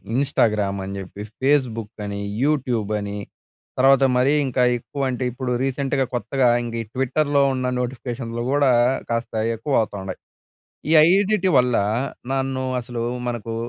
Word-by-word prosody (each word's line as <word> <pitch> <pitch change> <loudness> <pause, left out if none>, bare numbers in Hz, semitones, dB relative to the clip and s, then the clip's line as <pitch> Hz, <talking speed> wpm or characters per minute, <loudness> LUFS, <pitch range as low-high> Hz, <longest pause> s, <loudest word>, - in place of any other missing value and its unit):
Instagram 105 -7 +1
అని, 95 +1 -5
చెప్పి 95 +1 -9 0.2
Facebook 125 -6 +1
అని, 100 0 -4 0.2
యూట్యూబ్ 125 -8 0
అని 100 0 -5 0.6
తర్వాత 135 +1 +5
మరీ 130 +3 +3
ఇంకా 130 0 0 0.2
ఎక్కువ 140 +4 -7
అంటే, 125 0 -3
ఇప్పుడు 125 +1 -4
రీసెంట్‍గా 135 0 0
కొత్తగా 130 +1 +1 0.2
ఇంగా 115 -1 -4
ఈ - - -14
ట్విట్టర్‍లో 140 +2 +1
ఉన్న 130 0 -1
నోటిఫికేషన్‌లు 120 -1 -4
కూడా 140 -2 +3 0.4
కాస్త 115 0 -2 0.2
ఎక్కువవుతుండాయి. 105 -6 -2 0.7
ఈ - - +3 0.2
ఐదిటి 195 +2 +3
వల్ల 125 -1 +2 0.6
నన్ను 135 -1 -1 0.2
అసలు 120 -1 -5 0.3
మనకు 115 -1 -4
125 Hz, 125 wpm, -22 LUFS, 115-135 Hz, 0.7 s, తర్వాత